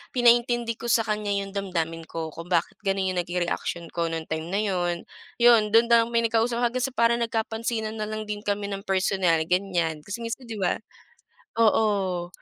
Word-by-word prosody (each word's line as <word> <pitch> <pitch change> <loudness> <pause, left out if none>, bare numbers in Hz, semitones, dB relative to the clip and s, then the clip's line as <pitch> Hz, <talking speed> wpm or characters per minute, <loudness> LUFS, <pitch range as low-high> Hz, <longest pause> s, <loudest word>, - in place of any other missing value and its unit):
pinaintindi 240 -1 +3
ko 240 - -5
sa 225 - +4
kanya 210 -1 -1
yung 195 0 -3
damdamin 165 -4 -2
ko 160 -1 -5
kung 165 +2 -9
bakit - - +1
gano'n 195 -1 0
yung - - +1
naging 175 0 -1
reaction 170 0 -3
ko 170 -1 -1
nung 165 -1 -4
time 160 0 -3
na 200 - +1
'yon. 175 -3 -1 0.4
Iyon, 230 -3 +6
do'n 230 +1 +6
na 230 -1 +7
kami 235 0 +1
nagkausap 230 +1 +1
hanggang 245 +1 0
sa 265 - -5
parang 235 0 +3
nagkapansinan 225 0 -2
na 215 - -2
lang 215 0 -4
din 210 0 -3
kami 205 0 -1
ng 195 0 -4
personal, 190 -3 +2
ganiyan. 175 -4 0
Kasi 205 +6 -6
minsan 240 +2 -5
di 225 - -5
ba, 180 - 0 0.8
oo, 200 -5 +2
205 Hz, 190 wpm, -25 LUFS, 175-230 Hz, 0.8 s, na